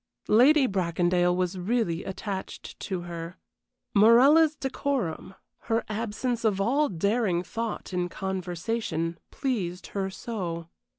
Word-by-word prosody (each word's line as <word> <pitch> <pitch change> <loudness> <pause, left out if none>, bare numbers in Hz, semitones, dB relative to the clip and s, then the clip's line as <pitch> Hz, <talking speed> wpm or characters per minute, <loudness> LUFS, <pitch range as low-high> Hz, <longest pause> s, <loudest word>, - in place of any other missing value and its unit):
Lady 265 +6 +6
Bracondale 175 -3 +1
was 185 +1 -1
really 185 -3 0
attached 190 0 -6
to 185 -3 -3
her. 170 0 -7 0.6
Morella's 270 +9 +6
decorum, 265 - -3 0.3
her 225 0 +1
absence 230 +2 -2
of 210 -4 +2
all 275 +9 +2
daring 195 0 +1
thought 225 +1 -5
in 180 -1 -1
conversation, 180 -2 -3
pleased 190 -10 -3
her 195 -1 -1
so. 180 -5 -5
195 Hz, 110 wpm, -27 LUFS, 175-230 Hz, 0.6 s, Lady